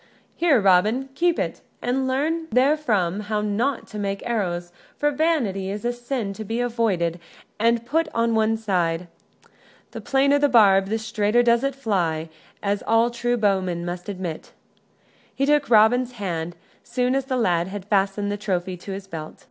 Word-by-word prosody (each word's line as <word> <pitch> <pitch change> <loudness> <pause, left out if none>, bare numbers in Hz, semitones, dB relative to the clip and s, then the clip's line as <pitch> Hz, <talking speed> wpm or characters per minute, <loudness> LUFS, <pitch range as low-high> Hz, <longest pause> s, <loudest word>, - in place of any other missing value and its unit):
"Here, 320 -7 +3
Robin, 210 +7 +3
keep 345 +4 +1
it, - - -3 0.2
and 260 +2 -1
learn 315 +5 -1
therefrom 240 - +2
how 210 0 -2
not 225 +6 -1
to 210 - -6
make 200 -1 -3
arrows, 175 -7 -2 0.3
for 295 0 +1
vanity 270 - 0
is 205 +3 -5
a 240 - +1
sin 240 -4 -4
to 220 - -7
be 225 +3 -3
avoided 215 -9 0 0.4
and 230 +1 +2
put 320 +5 +1
on 230 0 +1
one 220 0 +2
side. 180 -5 -1 0.9
The - - -7
plainer 280 +1 +3
the 290 0 +3
barb 195 -5 +5
the 220 +3 0
straighter 220 +1 +1
does 235 +1 +3
it 275 -1 -1
fly, 170 -11 -1 0.3
as 200 0 0
all 225 +1 +3
true 240 0 -1
bowmen 190 -5 0
must 175 +2 -5
admit." 180 -5 -6 0.8
He 275 - +1
took 295 -1 +2
Robin's 240 +3 +4
hand, 175 -6 -4 0.3
soon 250 +1 0
as 270 -1 0
the 260 -1 -1
lad 175 -7 +1
had 195 0 -7
fastened 205 0 0
the 205 - -2
trophy 185 -3 -2
in 195 - -5
his 195 0 -7
belt. 160 -5 -7
220 Hz, 170 wpm, -23 LUFS, 195-250 Hz, 0.9 s, barb